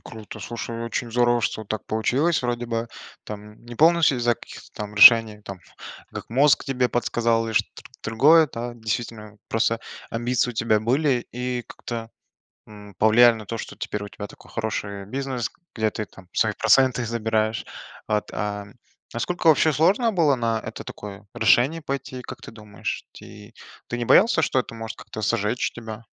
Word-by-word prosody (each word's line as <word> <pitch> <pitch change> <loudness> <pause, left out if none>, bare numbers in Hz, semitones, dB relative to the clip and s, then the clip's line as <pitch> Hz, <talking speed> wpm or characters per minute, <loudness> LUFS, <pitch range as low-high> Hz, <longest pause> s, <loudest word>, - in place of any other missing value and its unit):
Круто! 110 -2 -10
Слушай, 115 +2 -5
очень 115 0 -3
здорово, 120 0 +3
что 110 0 -2
так 110 +1 -4
получилось. 130 +8 +1
Вроде 120 0 -2
бы 115 0 -2 0.4
там 105 +1 -10
не 120 0 -9
полностью 160 -2 +4
из-за 120 0 +2
каких-то - - -13
там 105 0 -6
решений, 110 0 +8
там, 100 -2 -8 0.5
как - - -8
мозг 140 +3 +4
тебе 130 -3 0
подсказал 115 -1 0
или 110 - -4
шт 105 - +2 0.3
тр - - -5
другое, 155 +7 +6
да 120 +1 -4
действительно 110 -2 -5
просто 115 +1 +1 0.3
амбиции 120 +1 0
у - - -10
тебя 110 -1 +2
были 130 +2 +1
и 125 0 -3
как-то, 115 -1 -7 0.6
м, 105 -2 -13
повлияли 115 +4 +6
на 110 -1 -9
то, 115 +3 -4
что - - -7
теперь 105 0 -4
у 105 - -8
тебя 105 - -7
такой - - -17
хороший 100 -3 -4
бизнес, 130 -1 -3 0.3
где 110 -1 +1
ты 110 - -4
там 95 -2 -17
свои - - +2
проценты 130 -2 +3
забираешь. 110 -1 -1 0.4
А 105 -1 +1
т - - -13 0.8
а - - -7
сколько 175 +4 -1
вообще 155 0 +5
сложно 195 - +3
было 160 -7 +3
на 115 -2 0
это - - -7
такое 100 -1 -9
решение 120 +8 +3
пойти? 135 -3 -5
Как - - -10
ты - - -10
думаешь, 105 -2 -6
ти 105 +2 -13 0.3
ты 120 - -3
не 120 - -2
боялся, 215 - +5
что 130 - +1
это 120 - -5
может 115 0 -7
как-то 110 - -8
"сжечь" 105 +4 0
тебя? 115 -1 -8
115 Hz, 175 wpm, -24 LUFS, 110-125 Hz, 0.8 s, решений